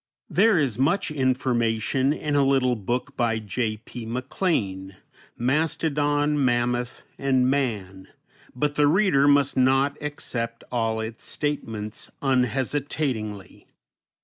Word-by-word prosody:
There 220 Hz, -4 st, +4 dB
is 135 Hz, -7 st, 0 dB
much 155 Hz, +6 st, +1 dB
information 130 Hz, -2 st, +1 dB
in 150 Hz, -1 st, -2 dB
a 140 Hz, -, +4 dB
little 135 Hz, -2 st, +2 dB
book 125 Hz, +6 st, -3 dB
by 115 Hz, -2 st, +1 dB
J. 110 Hz, +1 st, -2 dB
P. 120 Hz, +2 st, -9 dB
MacLean, 110 Hz, -, -2 dB, 0.4 s
"Mastodon, 145 Hz, +1 st, +1 dB
Mammoth, 120 Hz, 0 st, 0 dB, 0.2 s
and 130 Hz, -2 st, +2 dB
Man," 105 Hz, -9 st, -2 dB, 0.5 s
but 145 Hz, +3 st, 0 dB
the 150 Hz, 0 st, +3 dB
reader 150 Hz, -4 st, +4 dB
must 145 Hz, -1 st, +4 dB
not 135 Hz, +2 st, +3 dB
accept 115 Hz, -6 st, -4 dB
all 115 Hz, -2 st, 0 dB
its 110 Hz, +1 st, -6 dB
statements 110 Hz, -8 st, -4 dB
unhesitatingly. 130 Hz, -4 st, -1 dB
130 Hz, 110 wpm, -25 LUFS, 115-145 Hz, 0.5 s, There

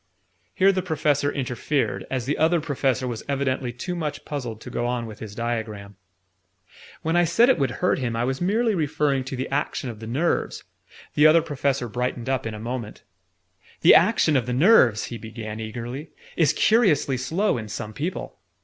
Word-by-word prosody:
Here 195 Hz, +1 st, +5 dB
the 185 Hz, -1 st, -1 dB
Professor 150 Hz, -4 st, 0 dB
interfered, 135 Hz, +2 st, -2 dB
as 130 Hz, -3 st, -2 dB
the 145 Hz, -, 0 dB
Other 165 Hz, +2 st, +3 dB
Professor 135 Hz, -4 st, -1 dB
was 120 Hz, -3 st, -4 dB
evidently 135 Hz, -2 st, -1 dB
too 175 Hz, +9 st, -5 dB
much 150 Hz, -4 st, -4 dB
puzzled 125 Hz, -7 st, -5 dB
to 125 Hz, -, -9 dB
go 120 Hz, 0 st, -1 dB
on 120 Hz, -1 st, -2 dB
with 110 Hz, -2 st, -10 dB
his 105 Hz, -2 st, -8 dB
diagram. 110 Hz, -4 st, -4 dB, 1.1 s
"When 160 Hz, +1 st, 0 dB
I 175 Hz, -, +5 dB
said 225 Hz, +9 st, +4 dB
it 260 Hz, -, +3 dB
would 135 Hz, -2 st, +1 dB
hurt 125 Hz, -, 0 dB
him, 120 Hz, -3 st, -2 dB
I 115 Hz, -, 0 dB
was 135 Hz, +4 st, -2 dB
merely 220 Hz, +5 st, +2 dB
referring 150 Hz, -5 st, 0 dB
to 130 Hz, -, -5 dB
the 130 Hz, +1 st, -3 dB
action 135 Hz, -2 st, -2 dB
of 110 Hz, -, -12 dB
the 110 Hz, -, -8 dB
nerves 145 Hz, +9 st, -1 dB, 0.3 s
" -, -, -21 dB
The 150 Hz, +1 st, +6 dB
Other 160 Hz, +1 st, +5 dB
Professor 140 Hz, -5 st, -1 dB
brightened 125 Hz, +1 st, -3 dB
up 130 Hz, -3 st, -1 dB
in 110 Hz, -, -5 dB
a -, -, -8 dB
moment. 115 Hz, -1 st, -6 dB, 0.8 s
"The -, -, +8 dB
action 155 Hz, -, +4 dB
of 125 Hz, -3 st, +1 dB
the 125 Hz, -, -1 dB
nerves," 130 Hz, -, +5 dB
he 115 Hz, -, -6 dB
began 110 Hz, -1 st, -7 dB
eagerly, 120 Hz, +7 st, -6 dB, 0.3 s
"is 160 Hz, -5 st, +4 dB
curiously 200 Hz, -, +3 dB
slow 155 Hz, -, 0 dB
in 110 Hz, -, -7 dB
some 105 Hz, +1 st, -6 dB
people. 165 Hz, +9 st, -5 dB
130 Hz, 190 wpm, -24 LUFS, 120-155 Hz, 1.1 s, The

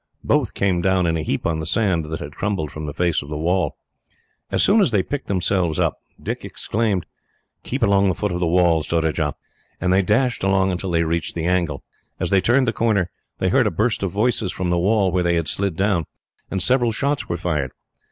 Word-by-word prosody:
Both -, -, +1 dB
came 95 Hz, -3 st, +1 dB
down 95 Hz, 0 st, +2 dB
in 80 Hz, -1 st, +1 dB
a 80 Hz, -, -1 dB
heap 75 Hz, 0 st, -2 dB
on 80 Hz, -3 st, 0 dB
the 80 Hz, -, -4 dB
sand 95 Hz, -5 st, +1 dB
that 80 Hz, +1 st, -5 dB
had 75 Hz, -, -6 dB
crumbled 95 Hz, -7 st, -2 dB
from 75 Hz, 0 st, -6 dB
the -, -, -3 dB
face 85 Hz, -1 st, +1 dB
of 70 Hz, -, -10 dB
the 75 Hz, -, -4 dB
wall. 90 Hz, +4 st, 0 dB, 0.7 s
As -, -, +2 dB
soon 210 Hz, +2 st, +5 dB
as 195 Hz, -, +4 dB
they 105 Hz, -5 st, +2 dB
picked 140 Hz, +7 st, -5 dB
themselves 90 Hz, -3 st, 0 dB
up, -, -, 0 dB, 0.2 s
Dick -, -, -4 dB
exclaimed, 105 Hz, -5 st, -1 dB, 0.6 s
"Keep -, -, -3 dB
along 100 Hz, 0 st, +4 dB
the 95 Hz, -, +1 dB
foot 105 Hz, -, -2 dB
of 90 Hz, -, -2 dB
the 90 Hz, -, +1 dB
wall, 85 Hz, -1 st, +3 dB
Surajah," 80 Hz, -2 st, 0 dB, 0.4 s
and 90 Hz, +1 st, +1 dB
they 95 Hz, -, +4 dB
dashed 120 Hz, +5 st, +1 dB
along 95 Hz, 0 st, +2 dB
until 90 Hz, +1 st, -3 dB
they 85 Hz, -1 st, +2 dB
reached 85 Hz, 0 st, -2 dB
the 85 Hz, -1 st, -2 dB
angle. 85 Hz, -6 st, 0 dB, 0.4 s
As -, -, -2 dB
they 100 Hz, -1 st, +4 dB
turned 125 Hz, +4 st, +3 dB
the 115 Hz, -, +1 dB
corner, 100 Hz, -6 st, +1 dB, 0.3 s
they -, -, 0 dB
heard -, -, +3 dB
a -, -, +3 dB
burst 110 Hz, +1 st, 0 dB
of 95 Hz, -, 0 dB
voices 105 Hz, -1 st, 0 dB
from 90 Hz, -1 st, -2 dB
the 90 Hz, -, +2 dB
wall 100 Hz, +1 st, +2 dB
where 90 Hz, -, +1 dB
they 85 Hz, -1 st, +2 dB
had 85 Hz, -2 st, -1 dB
slid 100 Hz, -4 st, -1 dB
down, 95 Hz, -4 st, +1 dB, 0.4 s
and 95 Hz, -, -1 dB
several 125 Hz, -2 st, +3 dB
shots 140 Hz, +5 st, -1 dB
were 85 Hz, -, -1 dB
fired. 75 Hz, -7 st, -1 dB
90 Hz, 225 wpm, -21 LUFS, 85-100 Hz, 0.7 s, soon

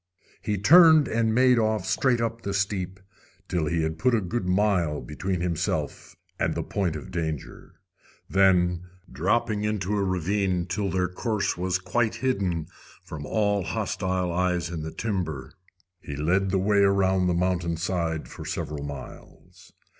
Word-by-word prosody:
He 105 Hz, -1 st, -1 dB
turned 160 Hz, -, +7 dB
and 115 Hz, 0 st, +1 dB
made 125 Hz, +1 st, +4 dB
off 110 Hz, -1 st, 0 dB
straight 130 Hz, -3 st, +2 dB
up 115 Hz, 0 st, -2 dB
the 100 Hz, -2 st, -3 dB
steep, 95 Hz, -1 st, -2 dB, 0.5 s
till 85 Hz, -4 st, -1 dB
he 80 Hz, +1 st, 0 dB
had 80 Hz, 0 st, -3 dB
put 125 Hz, -2 st, +3 dB
a -, -, +2 dB
good 95 Hz, +1 st, -3 dB
mile 90 Hz, -5 st, +1 dB
between 90 Hz, +4 st, -3 dB
himself 85 Hz, -3 st, -2 dB, 0.2 s
and -, -, 0 dB
the -, -, -2 dB
point 90 Hz, -6 st, -2 dB
of 75 Hz, -, -8 dB
danger. 80 Hz, -4 st, -5 dB, 0.5 s
Then, 90 Hz, -3 st, +3 dB, 0.3 s
dropping 105 Hz, -, 0 dB
into 105 Hz, -2 st, -1 dB
a 100 Hz, -, +1 dB
ravine 95 Hz, 0 st, 0 dB
till 100 Hz, +2 st, -2 dB
their 90 Hz, 0 st, 0 dB
course 105 Hz, +3 st, -1 dB
was 90 Hz, +1 st, 0 dB
quite 115 Hz, +4 st, 0 dB
hidden 100 Hz, -10 st, -1 dB, 0.4 s
from 75 Hz, -2 st, -7 dB
all 105 Hz, -2 st, +1 dB
hostile 95 Hz, -3 st, -2 dB
eyes 90 Hz, -1 st, 0 dB
in 85 Hz, -2 st, -4 dB
the 80 Hz, -, -4 dB
timber, 90 Hz, -, -3 dB, 0.5 s
he 70 Hz, -, -7 dB
led 90 Hz, +7 st, +1 dB
the 95 Hz, -, +1 dB
way 100 Hz, +2 st, +2 dB
around 95 Hz, -2 st, +3 dB
the 90 Hz, -, +1 dB
mountainside 85 Hz, -3 st, -1 dB
for -, -, -9 dB
several 75 Hz, -2 st, -4 dB
miles. 70 Hz, -1 st, -11 dB
95 Hz, 155 wpm, -26 LUFS, 85-105 Hz, 0.5 s, turned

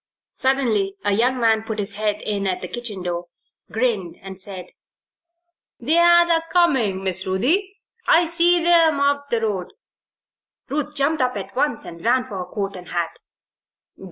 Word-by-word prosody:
Suddenly 230 Hz, -8 st, +1 dB
a 205 Hz, -, +3 dB
young 250 Hz, +5 st, +1 dB
man 225 Hz, -2 st, +3 dB
put 220 Hz, -1 st, -5 dB
his 200 Hz, -1 st, -2 dB
head 210 Hz, 0 st, -2 dB
in 200 Hz, -2 st, -2 dB
at 185 Hz, -1 st, -2 dB
the -, -, -3 dB
kitchen 215 Hz, -4 st, -5 dB
door, 175 Hz, 0 st, -3 dB, 0.5 s
grinned, 220 Hz, -7 st, -1 dB
and 190 Hz, -1 st, -8 dB
said: 185 Hz, -2 st, -7 dB, 1.1 s
"They're 340 Hz, +6 st, +5 dB
a 330 Hz, -1 st, +3 dB
comin', 260 Hz, -, +2 dB
Miss 190 Hz, 0 st, -1 dB
Ruthie. 340 Hz, -, 0 dB, 0.3 s
I 340 Hz, +1 st, +5 dB
see 340 Hz, +1 st, +3 dB
'em 330 Hz, -4 st, +4 dB
up 285 Hz, 0 st, +1 dB
the 235 Hz, -3 st, 0 dB
road." 200 Hz, -5 st, -2 dB, 1.0 s
Ruth 300 Hz, +1 st, -3 dB
jumped 285 Hz, +1 st, +2 dB
up 250 Hz, -3 st, 0 dB
at 195 Hz, +2 st, -7 dB
once 260 Hz, -3 st, -1 dB
and 170 Hz, 0 st, -10 dB
ran 250 Hz, +2 st, +2 dB
for 210 Hz, -7 st, -7 dB
her 180 Hz, -, -4 dB
coat 200 Hz, -2 st, -3 dB
and 180 Hz, -1 st, -9 dB
hat. 170 Hz, -1 st, -3 dB
225 Hz, 160 wpm, -21 LUFS, 195-285 Hz, 1.1 s, They're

